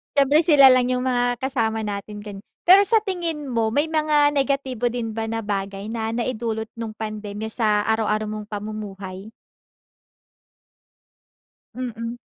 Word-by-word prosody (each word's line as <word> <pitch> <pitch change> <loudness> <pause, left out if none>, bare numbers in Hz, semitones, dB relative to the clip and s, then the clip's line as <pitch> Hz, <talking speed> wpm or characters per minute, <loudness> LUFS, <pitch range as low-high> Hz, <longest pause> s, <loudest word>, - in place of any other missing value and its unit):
Siyempre 285 +3 +4
sila 285 -5 +8
lang 255 0 +4
'yung 250 - -1
mga 245 -1 0
kasama 225 -5 -1
natin 210 0 -5
kani 205 -1 -8 0.3
Pero 385 +3 +7
sa 445 +2 +3
tingin 340 -8 -3
mo 225 -2 0
may 295 +4 +1
mga 305 -2 +3
negatibo 275 -4 -1
din 240 -1 -3
ba 225 0 -3
na 225 0 -3
bagay 200 -1 -4
na 225 -1 -3
naidulot 230 -2 -3
nung 225 -1 -5
pandemya 215 0 -5
sa 215 -2 +2
araw-araw 215 -1 0
mong 215 -1 -6
pamumuhay? 205 -2 -7 2.5
Mm. 235 -2 -5
230 Hz, 135 wpm, -23 LUFS, 215-270 Hz, 2.5 s, sila